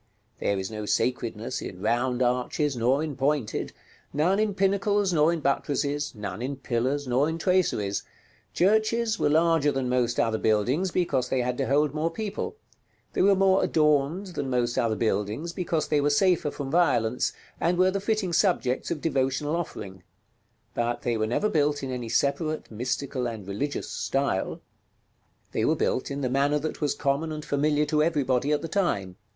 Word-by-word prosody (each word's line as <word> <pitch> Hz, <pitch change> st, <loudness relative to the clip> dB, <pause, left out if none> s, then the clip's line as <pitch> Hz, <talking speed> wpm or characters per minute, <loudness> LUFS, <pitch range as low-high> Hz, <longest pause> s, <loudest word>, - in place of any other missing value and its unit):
There 100 Hz, -, 0 dB
is 95 Hz, +2 st, -4 dB
no 105 Hz, -1 st, -5 dB
sacredness 115 Hz, 0 st, -1 dB
in 90 Hz, -, -7 dB
round 120 Hz, +4 st, +1 dB
arches, 125 Hz, +4 st, 0 dB
nor 125 Hz, +5 st, +2 dB
in 155 Hz, -3 st, -4 dB
pointed; 135 Hz, -4 st, -1 dB, 0.4 s
none 175 Hz, +8 st, +2 dB
in 215 Hz, -2 st, +1 dB
pinnacles, 200 Hz, 0 st, +2 dB
nor 155 Hz, 0 st, +4 dB
in 170 Hz, -2 st, -2 dB
buttresses; 145 Hz, 0 st, -1 dB
none 105 Hz, +1 st, -5 dB
in 135 Hz, +3 st, -3 dB
pillars, 135 Hz, +2 st, -1 dB
nor 130 Hz, +5 st, +2 dB
in 160 Hz, -, -3 dB
traceries. 165 Hz, -, +1 dB, 0.5 s
Churches 220 Hz, +3 st, +2 dB
were -, -, +2 dB
larger 160 Hz, -1 st, +3 dB
than 135 Hz, -2 st, -2 dB
most 125 Hz, -1 st, +1 dB
other 110 Hz, -1 st, +1 dB
buildings, 125 Hz, -, +1 dB
because 145 Hz, -8 st, 0 dB
they 130 Hz, -, +1 dB
had 125 Hz, 0 st, -1 dB
to 135 Hz, -, 0 dB
hold 145 Hz, +1 st, +2 dB
more 155 Hz, +2 st, 0 dB
people; 215 Hz, -, -4 dB, 0.6 s
they -, -, +1 dB
were 195 Hz, +1 st, +5 dB
more 190 Hz, 0 st, +4 dB
adorned 150 Hz, +4 st, +2 dB
than 140 Hz, -4 st, -3 dB
most 120 Hz, -1 st, 0 dB
other 115 Hz, -2 st, +1 dB
buildings, 110 Hz, +9 st, -1 dB
because 175 Hz, -4 st, -1 dB
they 150 Hz, -1 st, +3 dB
were 145 Hz, -, +2 dB
safer 175 Hz, +1 st, +3 dB
from 140 Hz, -2 st, -6 dB
violence, 125 Hz, -9 st, +2 dB, 0.3 s
and 175 Hz, +1 st, +1 dB
were 185 Hz, +1 st, +4 dB
the 195 Hz, -, -1 dB
fitting 205 Hz, -4 st, -1 dB
subjects 160 Hz, -9 st, +1 dB
of 160 Hz, -4 st, -3 dB
devotional 140 Hz, +1 st, 0 dB
offering: 95 Hz, -, -5 dB, 0.7 s
but 120 Hz, 0 st, -1 dB
they 120 Hz, -1 st, 0 dB
were 110 Hz, -1 st, 0 dB
never 125 Hz, -, +1 dB
built 145 Hz, -5 st, +1 dB
in 135 Hz, -, -3 dB
any 125 Hz, -2 st, -4 dB
separate, 155 Hz, +4 st, 0 dB
mystical, 125 Hz, +2 st, -2 dB
and 110 Hz, -5 st, -6 dB
religious 125 Hz, +9 st, -3 dB
style; 135 Hz, -9 st, -1 dB, 0.9 s
they -, -, -1 dB
were -, -, +3 dB
built 130 Hz, -, -1 dB
in 140 Hz, 0 st, -4 dB
the 130 Hz, -, 0 dB
manner 140 Hz, +3 st, +2 dB
that 155 Hz, +2 st, -4 dB
was 150 Hz, -, +1 dB
common 140 Hz, +3 st, 0 dB
and 155 Hz, -1 st, -5 dB
familiar 150 Hz, +1 st, +1 dB
to 150 Hz, 0 st, +1 dB
everybody 145 Hz, -4 st, +1 dB
at 150 Hz, -, +1 dB
the -, -, -2 dB
time. 100 Hz, -, -1 dB
145 Hz, 175 wpm, -26 LUFS, 125-165 Hz, 0.9 s, were